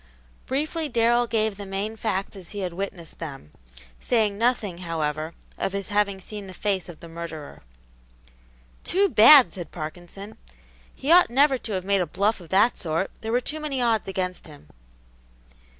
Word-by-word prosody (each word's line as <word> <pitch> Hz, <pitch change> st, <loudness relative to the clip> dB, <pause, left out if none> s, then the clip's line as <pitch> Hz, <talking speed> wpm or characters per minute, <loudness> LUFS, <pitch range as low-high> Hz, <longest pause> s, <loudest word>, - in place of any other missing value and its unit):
Briefly 305 Hz, +4 st, -2 dB
Darrell 240 Hz, 0 st, +3 dB
gave 220 Hz, -3 st, 0 dB
the 200 Hz, -, -7 dB
main 200 Hz, +3 st, -3 dB
facts 205 Hz, -3 st, -2 dB
as 185 Hz, -3 st, -10 dB
he 205 Hz, -1 st, -5 dB
had 180 Hz, -2 st, -3 dB
witnessed 180 Hz, -3 st, -6 dB
them, 135 Hz, -, -8 dB, 0.5 s
saying 215 Hz, -4 st, +1 dB
nothing, 215 Hz, -5 st, 0 dB
however, 160 Hz, -2 st, -3 dB, 0.2 s
of 195 Hz, -, -1 dB
his 200 Hz, +1 st, -4 dB
having 205 Hz, -2 st, +1 dB
seen 205 Hz, +1 st, -8 dB
the 185 Hz, -, -10 dB
face 195 Hz, -3 st, -2 dB
of 165 Hz, -, -11 dB
the 170 Hz, -, -10 dB
murderer. 165 Hz, -3 st, -8 dB, 1.2 s
"Too 395 Hz, +2 st, +2 dB
bad!" 260 Hz, +3 st, +8 dB
said 175 Hz, -5 st, -7 dB
Parkinson. 175 Hz, +6 st, -8 dB, 0.6 s
"He 280 Hz, -, -2 dB
ought 355 Hz, +1 st, +7 dB
never 270 Hz, +2 st, +3 dB
to 220 Hz, -, -6 dB
have 185 Hz, -1 st, -3 dB
made 200 Hz, -1 st, +2 dB
a 175 Hz, -, -1 dB
bluff 200 Hz, +7 st, 0 dB
of 170 Hz, -3 st, -13 dB
that 205 Hz, +6 st, +3 dB
sort; 165 Hz, +2 st, -1 dB
there 225 Hz, 0 st, -4 dB
were 245 Hz, +2 st, +2 dB
too 305 Hz, +5 st, -3 dB
many 295 Hz, -4 st, -3 dB
odds 230 Hz, -4 st, +1 dB
against 185 Hz, -2 st, -3 dB
him." 145 Hz, -, -15 dB
200 Hz, 170 wpm, -25 LUFS, 175-230 Hz, 1.2 s, bad